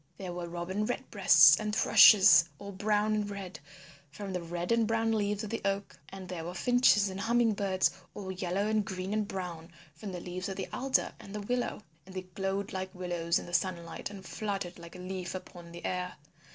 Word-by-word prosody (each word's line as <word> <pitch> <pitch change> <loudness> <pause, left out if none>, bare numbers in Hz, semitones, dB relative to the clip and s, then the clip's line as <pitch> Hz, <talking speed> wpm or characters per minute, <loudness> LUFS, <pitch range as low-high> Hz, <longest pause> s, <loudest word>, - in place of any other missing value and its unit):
There 185 -2 -6
were 175 -1 -5
Robin 175 +4 -3
Red 245 +4 -4
breasts 165 -6 +7
and 210 0 -2
Thrushes 195 -7 +8
all 200 0 -8
brown 210 +2 +1
and 210 -1 -1
red, 195 -2 -7 0.5
from 195 +5 -7
the 180 - -2
red 175 +3 -4
and 230 -1 +3
brown 225 0 +1
leaves 210 -1 0
of 215 - -6
the 230 - -3
Oak. 195 0 -2
And 190 -1 -9
there 175 -3 -5
were 175 +2 -6
Finches 245 0 +4
and 190 0 -5
Humming 235 0 +2
birds 195 -2 +1 0.2
all 190 -2 -5
yellow 185 +2 -2
and 215 -1 +1
green 190 +1 -4
and 215 -1 0
brown 175 -4 -6 0.2
from 190 +6 -8
the 180 - -5
leaves 180 +2 -5
of 195 - -4
the 190 - -4
Alder 265 +1 0
and 200 - -10
the 210 - -3
Willow, 245 0 -2 0.2
and 190 - -12
they 185 - -4
glowed 195 +3 -3
like 190 0 -5
willows 175 -2 -1
in - - -5
the 175 - -10
sunlight 175 0 -2
and 195 -2 -10
fluttered 195 -5 -4
like 170 +1 -11
a - - -8
leaf 185 0 -5
upon 175 -2 -9
the 170 0 -9
air. 180 0 -3
190 Hz, 210 wpm, -30 LUFS, 180-210 Hz, 0.5 s, Thrushes